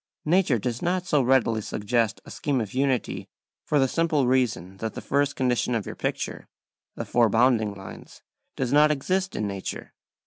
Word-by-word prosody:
Nature 165 -5 +3
does 120 +2 -3
not 180 +1 0
so 150 -7 +2
readily 120 -3 +2
suggest 110 +2 -1
a - - -11
scheme 140 -3 -1
of 110 -4 -4
unity, 130 -2 -1 0.4
for 150 - 0
the 135 -2 +4
simple 155 -2 +1
reason 120 -8 0
that 110 +2 -4
the - - -4
first 145 0 0
condition 125 -2 +1
of 110 - -2
your - - -5
picture, - - -3 0.5
the - - -4
four 120 -2 +3
bounding 110 -2 +3
lines, 95 0 -11 0.3
does 130 0 -1
not 150 +1 +6
exist 185 +6 -1
in 105 - -1
nature. 100 -1 -5
125 Hz, 175 wpm, -25 LUFS, 110-145 Hz, 0.5 s, not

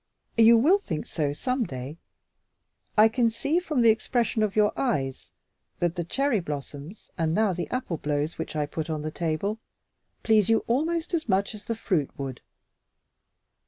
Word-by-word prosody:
"You 230 +1 +8
will 330 - +5
think 160 - -4
so 150 -4 -1
some 250 - -1
day. 140 - -7 1.0
I 215 +1 +8
can 230 +1 +2
see, 280 +9 0
from 305 -7 -1
the 230 -1 +7
expression 230 0 0
of 210 -2 0
your 210 -1 +3
eyes, 135 - -2 0.5
that 175 -1 0
the 175 -1 -3
cherry 270 - 0
blossoms 150 +3 -7
and 160 0 +1
now 215 -3 +2
the 170 -3 -4
apple 250 -10 -2
blows 150 +1 -2
which - - -5
I 150 -1 0
put 155 +2 -5
on 155 -1 -2
the 155 - -3
table 175 +7 -2 0.6
please 220 -2 +4
you 225 - +3
almost 320 +8 0
as 315 -7 -1
much 195 +2 +1
as 210 -1 -11
the 230 - -2
fruit 180 -10 0
would." 135 -3 -5
205 Hz, 170 wpm, -26 LUFS, 155-235 Hz, 1.0 s, You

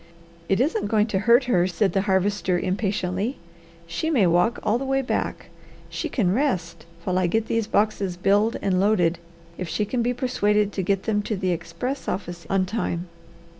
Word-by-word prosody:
"It 195 - +2
isn't 320 - +1
going 215 -2 +3
to 190 - +2
hurt 240 +3 +7
her," 185 -8 +2
said 190 +2 0
the 195 - +2
Harvester 190 -1 +1
impatiently. 195 +4 -1 0.5
"She 170 - -2
may 250 -12 +3
walk 175 +7 +3
all 225 +3 +1
the - - -3
way 270 0 0
back. - - -3 0.4
She - - -3
can 190 -8 +1
rest 175 - -1 0.2
while 185 0 0
I 185 - +2
get 220 +5 0
these 230 -2 -1
boxes 205 -4 0
billed 205 +5 +2
and 185 -2 +2
loaded 180 -4 +2 0.4
if 180 -3 -4
she 210 - 0
can 240 +3 -1
be 245 +1 0
persuaded 210 -5 +1
to 195 - -1
get 195 +1 0
them 210 -2 0
to 210 +1 -3
the 185 -1 -1
express 250 - -4
office 175 -3 -4
on 195 -1 +2
time. 180 -4 -3
200 Hz, 185 wpm, -24 LUFS, 180-225 Hz, 0.5 s, hurt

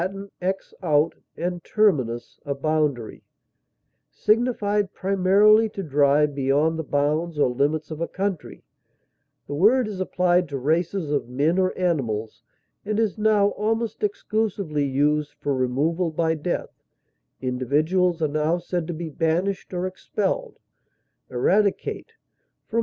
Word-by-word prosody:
ex, 190 +1 -3
out, 155 -2 +2 0.2
and 175 0 -3
terminus, 135 - 0
a 140 -1 -3
boundary) 145 -5 -1 0.9
signified 210 -3 +1
primarily 200 +3 +4
to 195 - -6
drive 145 -1 +3
beyond 145 +4 +1
the - - -2
bounds 150 +3 0
or 145 - +4
limits 145 +6 -1
of 155 +1 -6
a 170 - 0
country; 195 -3 -4 0.8
the - - -6
word 215 - +4
is 205 -3 -6
applied 180 -2 +1
to 140 - -3
races 160 +4 0
of 140 -4 -1
men 150 +8 +1
or 185 0 +2
animals, 120 - -1 0.4
and 215 +1 -1
is 220 -3 +1
now 210 -1 +4
almost 225 +1 -2
exclusively 210 - -1
used 145 +2 0
for 145 - -1
removal 145 +7 0
by 160 +1 0
death; 160 +2 -4 0.6
individuals 155 +8 +1
are - - +3
now 155 +3 0
said 175 -1 -3
to 175 - -3
be 170 +1 -5
banished 165 +5 -1
or 180 0 -2
expelled. 185 +1 -3 0.7
Eradicate 200 - 0 0.6
(L. 230 - +3
165 Hz, 130 wpm, -24 LUFS, 145-195 Hz, 0.9 s, primarily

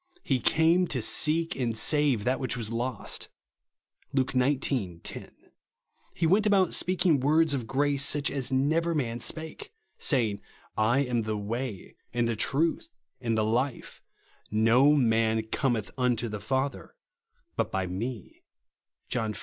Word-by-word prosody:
"lie 130 -2 +2
came 165 +6 +3
to 135 - -2
seek 160 +7 +1
and 120 -4 -2
save 145 -4 +2
that 130 +3 0
which 125 -3 -1
was 115 -2 -4
lost 120 +2 -4 0.4
" - - -41
(Luke 135 -1 +1
xix. 130 +1 +1 0.4
10); - - -6 0.8
he 170 - 0
went 200 +6 +3
about 195 -4 +3
speaking 180 -5 +2
words 155 +3 +3
of 125 -5 -2
grace 140 +1 +1
such 145 0 +1
as 135 -2 -1
never 160 +6 +1
man 120 -5 -2
spake, 160 +5 -5 0.3
saying, 110 -8 +1 0.3
" - - -41 0.2
I 140 - +3
am 125 -4 0
the 110 -1 -2
Way, 110 0 -5
and 120 -1 0
the 115 - -1
Truth, 160 - 0 0.3
and 115 -3 -1
the 110 - +2
Life: 120 +4 -2 0.5
no 115 +7 +4
man 115 -4 +2
cometh 120 -6 -1
unto 125 -2 +1
the 105 -1 -5
Father, 130 +5 -2 0.6
but - - -1
by 95 -1 -1
me" 105 +4 -6 0.7
(John 110 -3 -2
xiv. - - -7
130 Hz, 150 wpm, -28 LUFS, 115-145 Hz, 0.8 s, no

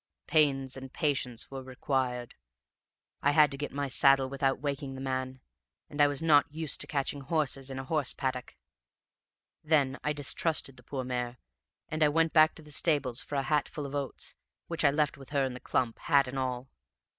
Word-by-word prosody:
Pains 135 -4 +2
and 135 -1 -8
patience 135 -7 -1
were 135 -1 -5
required: 130 -1 -2 0.9
I 145 - +3
had 150 -1 +6
to 140 - -5
get 145 - -3
my 140 +1 -2
saddle 135 +1 +4
without 135 0 0
waking 140 -2 -3
the - - -7
man, 130 -1 -3 0.5
and 145 0 0
I 145 - +7
was 145 +2 -2
not 145 -3 +5
used 155 -1 -1
to - - +2
catching 140 -1 -2
horses 140 -2 -1
in 135 - -6
a 130 - -4
horse 145 -1 +1
paddock. 130 - -4 1.1
Then 145 -4 +2
I 150 - +1
distrusted 145 0 0
the 125 - -15
poor 130 +1 -4
mare, 125 -1 -3 0.5
and 155 0 -4
I 150 - +6
went 165 +2 +2
back 155 0 +6
to 160 - -11
the 150 - -12
stables 145 -6 +1
for 145 - -6
a 135 - +1
hatful 150 0 -1
of 140 - -7
oats, 140 -2 -3 0.3
which 165 -1 -1
I 145 - +7
left 145 0 0
with 135 - -12
her 140 -2 +1
in 130 - -3
the 125 - -8
clump, 120 -2 -1
hat 140 -2 +3
and 135 +1 -4
all. 130 0 -3
140 Hz, 195 wpm, -30 LUFS, 130-150 Hz, 1.1 s, I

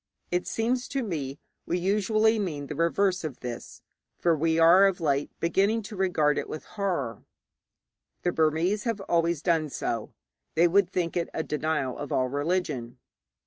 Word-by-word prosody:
It 180 0 0
seems 245 +2 0
to 275 -2 -2
me 145 - -4 0.3
we 175 - 0
usually 215 +4 +2
mean 155 -8 -3
the - - -5
reverse 180 +3 +1
of 150 -6 -6
this, 120 -2 -7 0.3
for 170 -2 +2
we 160 +1 +1
are 170 +4 +7
of 190 -2 -1
late 145 -3 0
beginning 200 +6 +2
to 210 - -8
regard 175 -6 +2
it - - -5
with 155 - -6
horror. 170 - -3 1.0
The 175 - +2
Burmese 165 +7 +1
have 230 -3 -1
always 170 -4 0
done 165 -4 +2
so. 115 -4 -3 0.4
They 170 +2 +5
would 185 +1 +3
think 175 -2 -2
it 170 -1 -1
a 160 - -1
denial 150 -4 -2
of 145 - -6
all 130 -1 +1
religion. 145 -4 -2
170 Hz, 165 wpm, -27 LUFS, 150-195 Hz, 1.0 s, are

